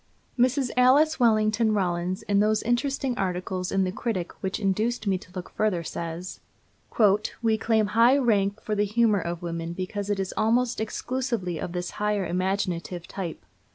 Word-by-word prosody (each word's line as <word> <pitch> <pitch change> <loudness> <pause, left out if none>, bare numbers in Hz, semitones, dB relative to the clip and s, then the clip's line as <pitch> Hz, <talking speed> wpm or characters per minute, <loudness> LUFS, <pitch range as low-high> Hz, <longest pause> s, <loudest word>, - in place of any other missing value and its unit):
Mrs. 255 +1 +2
Alice 275 +6 +4
Wellington 215 -1 +3
Rollins, 180 -1 -1
in 200 -1 +1
those 215 +1 +2
interesting 255 +2 0
articles 185 0 -2
in 195 0 +2
the 185 - -1
Critic 190 -4 -3
which 190 +2 -2
induced 215 +4 0
me 190 -2 +1
to 180 - -16
look 180 - -6
further, 200 -6 0
says: 170 +3 -6 1.0
"We 225 -1 +3
claim 220 -1 +2
high 230 +6 +4
rank 205 -5 +1
for 215 - -2
the 205 0 +2
humor 210 -1 +2
of 170 +1 -5
women 170 0 -4
because 195 +3 -4
it 205 -1 0
is 190 -1 -2
almost 235 +2 +1
exclusively 225 -6 -2
of 170 - -5
this 180 0 -3
higher, 210 -2 +1
imaginative 180 -1 -2
type. 180 -5 -6
205 Hz, 160 wpm, -26 LUFS, 185-230 Hz, 1.0 s, Alice